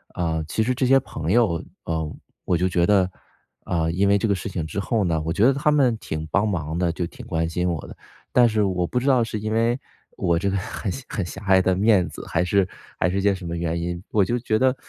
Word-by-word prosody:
呃， 80 -2 -1
其 110 - 0
实 125 +3 +1
这 125 +1 0
些 135 +1 +6
朋 80 - -4
友， 100 -7 +2 0.2
呃， 80 -2 -2 0.3
我 90 - +1
就 90 +2 +1
觉 90 -2 +1
得， 95 -3 +4 0.5
啊， 85 -3 0
因 95 +4 +2
为 100 0 +4
这 105 - 0
个 100 - +2
事 95 +2 -4
情 90 -4 -3
之 80 +5 -4
后 105 +1 0
呢， 80 -3 0
我 80 - -2
觉 100 +6 +3
得 135 - +5
他 145 +3 +1
们 135 -6 +3
挺 80 -5 -4
帮 100 +5 +2
忙 80 -6 -2
的， 90 -2 +1
就 85 +1 -3
挺 - - -10
关 80 0 0
心 90 +2 -1
我 85 -4 -3
的。 - - -10 0.4
但 120 -1 +5
是 105 -1 +1
我 90 -3 0
不 125 - 0
知 125 - -5
道 130 -3 +4
是 110 -1 -4
因 110 +1 -3
为， 115 +3 +2 0.4
我 85 -1 +1
这 100 - 0
个 100 - 0
很 95 +2 -4
狭 135 - -6
很 100 - -3
狭 95 +3 -8
隘 95 -1 +5
的 95 0 +2
面 100 -2 +3
子， - - -9
还 80 - +1
是 95 +1 +2 0.3
还 - - +3
是 100 +1 0
件 100 0 +3
什 95 -2 -9
么 85 0 -3
原 85 0 -2
因， 85 +1 -4
我 105 -3 +3
就 120 +6 -1
觉 110 -2 0
得： 130 +2 +3
95 Hz, 280 characters per minute, -23 LUFS, 85-110 Hz, 0.5 s, 些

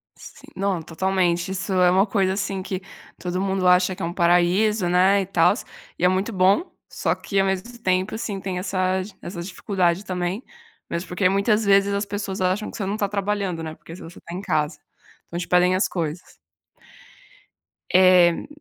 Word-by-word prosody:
Sim, - - -14
não 190 -3 -1
totalmente. 175 +2 0
Isso 190 +1 -3
é 180 -1 +4
uma 190 +2 +4
coisa 195 -3 +1
assim 195 -1 -3
que 185 -1 -4 0.4
todo 180 0 -3
mundo 190 -1 0
acha 180 +1 +4
que 190 - -10
é - - -1
um 170 - -4
paraíso, 180 +3 +2
né, 190 +3 +4
e - - -3
tals, 185 +4 +2 0.3
e - - -5
é - - +7
muito 190 +5 0
bom, 195 - +2 0.2
só - - -1
que 200 - -2
ao 195 - +3
mesmo 195 +6 -3
tempo, 185 +1 0
sim, 205 -3 -4
tem 185 -1 -4
essa 185 0 0 0.2
essa 175 -1 -6
dificuldade 185 0 -1
também, 180 +4 -3 0.5
mesmo 170 +2 -4
porque 185 +1 +1
muitas 210 +2 +2
vezes 200 0 +4
as 200 +1 -1
pessoas 200 -1 -4
acham 185 +3 0
que - - -9
você 200 - -3
não 200 +2 -2
está 205 -2 -1
trabalhando, 200 -3 -2
né, 160 -1 -6
porque 165 - -12
se - - -12
você 165 - -11
tá 170 - -10
em 180 - -4
casa, 150 -4 -1 0.5
então 170 - -6
te 175 - -5
pedem 180 +1 +3
as 190 - +2
coisas. 170 0 -5 1.6
Éh 180 -2 +5
185 Hz, 190 wpm, -23 LUFS, 180-200 Hz, 1.6 s, é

